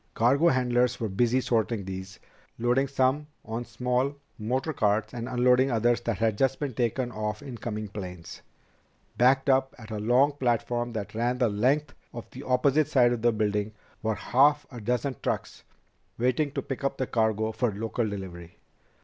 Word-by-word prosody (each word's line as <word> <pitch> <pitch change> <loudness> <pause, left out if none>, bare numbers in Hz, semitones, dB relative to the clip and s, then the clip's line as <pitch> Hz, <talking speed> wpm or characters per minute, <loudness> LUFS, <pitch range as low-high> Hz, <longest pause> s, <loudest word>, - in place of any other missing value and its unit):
Cargo 135 +8 +4
handlers 125 -3 +2
were 115 - -1
busy 120 +6 +2
sorting 115 -4 0
these, 95 0 -7 0.4
loading 120 +4 +2
some 135 +2 +1 0.2
on 115 +2 -4
small 125 +4 -1 0.2
motor 130 +8 -1
carts 105 -2 +1
and 120 0 -5
unloading 125 +1 +3
others 120 0 +2
that 115 -3 -2
had 110 -2 0
just 135 0 +2
been 145 -4 -3
taken 120 +2 -1
off 105 0 -4
incoming 115 -5 -5
planes. 90 -4 -8 0.8
Backed 130 +3 +4
up 135 0 +2
at 110 -2 -11
a 105 - -3
long 125 +7 +4
platform 120 -3 -1
that 105 -3 -5
ran 120 +3 0
the 125 -3 +2
length 135 +8 +1 0.2
of 120 - -7
the 130 - -9
opposite 140 +3 +2
side 125 -5 +4
of 120 - -3
the 120 +1 +4
building 105 -1 -1 0.3
were 110 -1 0
half 145 +6 +3
a 120 -3 -8
dozen 125 +3 -1
trucks - - -3 0.5
waiting 130 +5 +1
to - - -3
pick 135 0 -5
up 140 - -1
the 130 - 0
cargo 110 -2 0
for 110 +1 0
local 110 +2 -2
delivery. 90 -4 -8
120 Hz, 170 wpm, -27 LUFS, 110-130 Hz, 0.8 s, Cargo